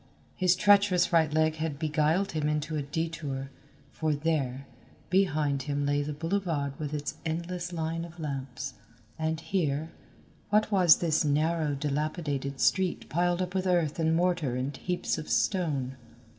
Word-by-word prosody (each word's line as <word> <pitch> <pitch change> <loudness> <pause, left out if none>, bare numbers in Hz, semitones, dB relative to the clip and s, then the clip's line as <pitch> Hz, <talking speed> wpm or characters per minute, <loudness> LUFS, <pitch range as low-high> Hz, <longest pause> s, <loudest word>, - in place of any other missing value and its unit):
His 185 -1 +3
treacherous 200 -2 +4
right 160 -2 +4
leg 155 +1 +2
had 155 -2 -2
beguiled 155 +5 +1
him 150 -2 0
into 150 +1 -1
a 150 - 0
detour, 145 -3 -4 0.4
for 155 -2 0
there, 140 -4 -1 0.5
behind 155 -7 +2
him 145 0 0
lay 145 0 +1
the 145 +1 -3
boulevard 165 -3 -1
with 150 -2 -3
its 150 -1 -4
endless 170 +2 -3
line 165 0 -2
of 170 0 -10
lamps, 135 -4 -4 0.5
and 160 0 -1
here, 160 -4 -1 0.6
what 210 +1 +2
was 180 -5 +7
this 165 -2 +1
narrow 155 0 +1
dilapidated 145 -1 -2
street 190 -2 +1
piled 175 +2 +1
up 180 0 -5
with 190 0 0
earth 170 -4 +1
and 160 0 +2
mortar 170 -7 +1
and 130 +3 -2
heaps 180 -2 -2
of 155 - -7
stone? 145 -9 0
160 Hz, 150 wpm, -29 LUFS, 145-175 Hz, 0.6 s, was